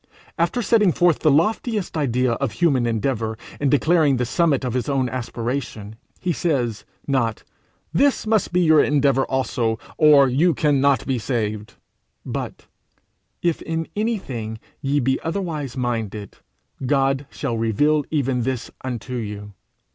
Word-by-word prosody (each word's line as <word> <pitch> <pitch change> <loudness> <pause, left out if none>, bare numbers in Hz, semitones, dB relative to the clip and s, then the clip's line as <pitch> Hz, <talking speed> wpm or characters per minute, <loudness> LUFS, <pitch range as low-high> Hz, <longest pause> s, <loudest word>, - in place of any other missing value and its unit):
After 200 +9 +1
setting 210 -3 +4
forth 175 -1 +3
the 155 - +3
loftiest 205 - +1
idea 130 -4 +1
of 115 -1 -2
human 130 -4 +2
endeavour 115 -1 -1 0.2
in 145 - +1
declaring 150 -1 +3
the 125 - 0
summit 155 0 +1
of 125 - -2
his 125 +3 -1
own 135 -2 +1
aspiration, 120 -3 -4 0.2
he 180 -2 -1
says 125 -11 -1 0.2
not, 120 -6 0 0.5
'This 275 - +2
must 220 -1 +1
be 180 +1 +2
your 160 -3 +5
endeavour 140 -2 +2
also, 120 -4 0 0.2
or 150 -3 +7
you 150 +6 +2
cannot 140 -2 +2
be 130 -3 -1
saved;' 110 -1 -3 0.5
but, - - -5 0.8
'If 170 -2 +1
in 165 0 -3
anything 135 - -3 0.2
ye 140 0 +1
be 130 0 +1
otherwise 160 -7 -3
minded, 110 -5 -3 0.5
God 135 +1 +1
shall 135 -5 -3
reveal 145 +7 +2
even 135 -5 0
this 130 0 -3
unto 125 0 -5
you. 105 -3 -5
135 Hz, 140 wpm, -22 LUFS, 120-155 Hz, 0.8 s, or